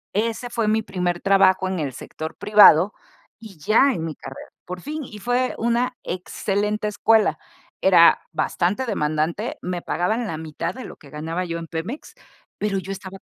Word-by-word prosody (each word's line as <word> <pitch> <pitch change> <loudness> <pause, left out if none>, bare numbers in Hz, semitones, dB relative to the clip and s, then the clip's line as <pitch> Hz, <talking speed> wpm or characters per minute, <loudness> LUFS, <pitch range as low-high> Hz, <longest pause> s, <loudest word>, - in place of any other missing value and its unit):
ese 230 +3 -1
fue 230 -3 -1
mi 220 +1 +2
primer 180 -3 -2
trabajo 190 -1 +4
en 185 -2 -2
el 140 -3 -2
sector 160 +4 -7
privado 205 -3 +6 0.5
y 215 -5 -12
ya 225 - +4
en 165 -4 -3
mi 155 - -5
carrera, 135 - -10 0.2
por 180 0 -7
fin, 305 0 -5
y 210 - -10
fue 245 +3 0
una 240 +2 0
excelente 205 +3 -2
escuela, 220 +1 +3 0.4
era 175 -3 +6
bastante 180 +8 0
demandante, 165 +2 -1
me 180 -1 -3
pagaban 220 +7 -1
la 160 -5 -4
mitad 160 +2 -4
de 255 - -7
lo - - -9
que 140 - -16
ganaba 165 +5 -4
yo 170 -1 -4
en 165 - -8
Pemex, 175 - -6 0.5
pero 210 -2 0
yo 190 +2 -7
estaba 190 0 -7
195 Hz, 170 wpm, -22 LUFS, 170-220 Hz, 0.5 s, privado